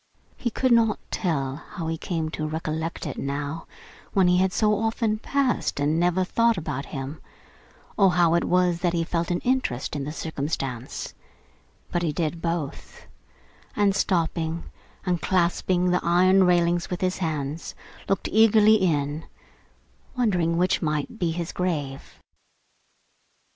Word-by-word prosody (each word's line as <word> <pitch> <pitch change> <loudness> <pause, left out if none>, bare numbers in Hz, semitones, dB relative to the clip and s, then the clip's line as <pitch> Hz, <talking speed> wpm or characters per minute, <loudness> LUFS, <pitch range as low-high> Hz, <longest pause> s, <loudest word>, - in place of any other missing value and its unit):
He 240 - -2
could 255 +3 0
not 225 -2 +4
tell 140 -8 -1
how 165 +1 -8
he 165 0 -1
came 160 -1 -3
to 155 -1 -3
recollect 160 +2 -3
it 145 - -5
now, 145 +3 -4 0.5
when 190 -2 +4
he 180 0 +4
had 190 0 +2
so 210 +2 +2
often 220 -1 0
passed 270 - 0
and 150 +3 +1
never 180 +2 +2
thought 230 +3 +2
about 150 -4 -4
him, 135 +2 -6 0.8
or 195 -3 +5
how 170 -1 +4
it 170 - +2
was 180 -1 +2
that 175 -1 0
he 170 -1 +1
felt 170 0 -2
an 175 0 0
interest 245 - -1
in 145 - -2
the 145 - -4
circumstance; 140 -6 -4 0.8
but 175 - 0
he 165 -3 0
did 165 +2 -2
both; 165 -4 -4 0.7
and 200 -2 +3
stopping, 165 -3 0 0.4
and 180 -2 0
clasping 180 0 +1
the 180 - +2
iron 185 +2 +5
railings 175 -1 +2
with 180 - -4
his 185 0 0
hands, 155 -2 -3 0.3
looked 195 - 0
eagerly 220 0 +6
in, 155 -5 0 0.9
wondering 180 -9 +1
which 180 +2 +2
might 150 +7 -2
be 175 -3 +1
his 170 +1 -3
grave. 145 -7 -3
170 Hz, 145 wpm, -25 LUFS, 155-185 Hz, 0.9 s, eagerly